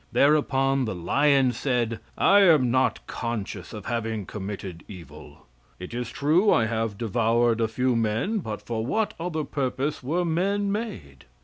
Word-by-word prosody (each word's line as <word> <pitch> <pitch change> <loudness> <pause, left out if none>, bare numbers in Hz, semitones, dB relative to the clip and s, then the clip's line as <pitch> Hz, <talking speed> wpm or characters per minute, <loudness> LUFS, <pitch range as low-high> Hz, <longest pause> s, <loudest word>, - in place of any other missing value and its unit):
Thereupon 135 -2 +2
the 110 - -3
lion 135 - +3
said: 120 -2 -1 0.2
"I 200 +1 +5
am 155 -11 +5
not 130 +1 +1
conscious 105 -5 -5
of 105 -2 -8
having 115 -3 -3
committed 95 -3 -7
evil. 90 -7 -12 0.3
It 90 - -8
is 120 -1 -3
true 165 +9 +2
I 115 - +3
have 110 -2 -2
devoured 115 +1 +1
a 115 - +2
few 125 +3 0
men, 115 - 0
but 110 - -6
for 115 -2 -3
what 215 - -1
other 165 -2 -2
purpose 140 +1 -2
were 165 +7 -1
men 200 +5 0
made?" 80 - -6
120 Hz, 150 wpm, -25 LUFS, 110-150 Hz, 0.3 s, I